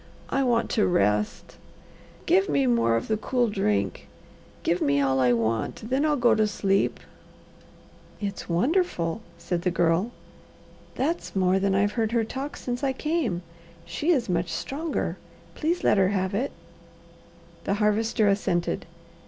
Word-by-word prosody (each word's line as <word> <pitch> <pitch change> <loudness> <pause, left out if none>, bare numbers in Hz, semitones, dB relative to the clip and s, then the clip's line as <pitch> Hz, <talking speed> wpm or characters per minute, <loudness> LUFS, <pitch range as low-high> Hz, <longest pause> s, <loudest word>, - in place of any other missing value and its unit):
I 275 - +2
want 235 -3 +1
to 215 - +2
rest. 105 - 0 0.7
Give 195 +1 +3
me 140 -2 +2
more 115 -2 +3
of 115 - -2
the 215 - +1
cool 245 +2 0
drink. 105 - -1 0.6
Give 175 - +1
me 140 0 +2
all 135 -1 +2
I 125 -1 +4
want, 115 - -1
then 275 +3 +2
I'll 300 - +2
go 240 -3 +4
to 215 -1 +3
sleep." 195 -1 0 1.2
"It's 200 -3 -5
wonderful," 190 - 0 0.2
said 175 -1 -2
the 180 - +1
Girl. 175 +4 +1 0.9
"That's 320 0 -2
more 190 0 +3
than 195 0 +1
I've 205 +1 +2
heard 225 0 -1
her 230 -2 +3
talk 270 +6 -5
since 245 +2 -4
I 270 -1 +1
came. 265 - -1 0.4
She 170 - -3
is 275 -9 +3
much 175 -1 0
stronger. 295 - -3 0.4
Please 335 +3 -1
let 205 - +4
her 190 - +4
have 190 -1 -1
it." 245 +8 -1 1.1
The 200 - +1
Harvester 215 +1 +2
assented. 190 -4 0
200 Hz, 150 wpm, -26 LUFS, 170-245 Hz, 1.2 s, I